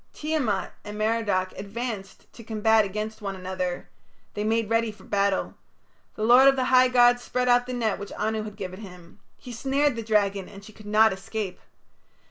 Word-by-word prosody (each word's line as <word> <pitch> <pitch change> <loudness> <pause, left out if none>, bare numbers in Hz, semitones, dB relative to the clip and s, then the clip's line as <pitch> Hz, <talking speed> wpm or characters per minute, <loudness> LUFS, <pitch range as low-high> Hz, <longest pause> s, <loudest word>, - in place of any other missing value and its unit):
Tiamat 280 -11 -2
and 210 0 -8
Merodach 215 -4 0
advanced 205 -1 -6
to 230 - -12
combat 220 0 +2
against 215 +3 -5
one 195 -1 -4
another. 185 -1 -4 0.5
They 210 - -3
made 225 0 +1
ready 230 0 +1
for 210 - -18
battle. 200 -1 0 0.6
The 215 - -4
lord 245 +4 +7
of 275 - +6
the 260 - 0
high 255 0 +7
gods 245 -1 +4
spread 250 0 -2
out 245 0 +3
the 255 - -4
net 225 -5 -1
which 200 - -8
Anu 220 +1 -2
had 210 -1 -8
given 185 -2 -7
him. 180 -4 -13 0.2
He 250 - -11
snared 275 +3 0
the 230 - -4
dragon 205 -3 0
and 200 0 -12
she 215 - -13
could 210 0 -14
not 215 0 +4
escape. 195 0 -5
215 Hz, 185 wpm, -25 LUFS, 200-240 Hz, 0.6 s, lord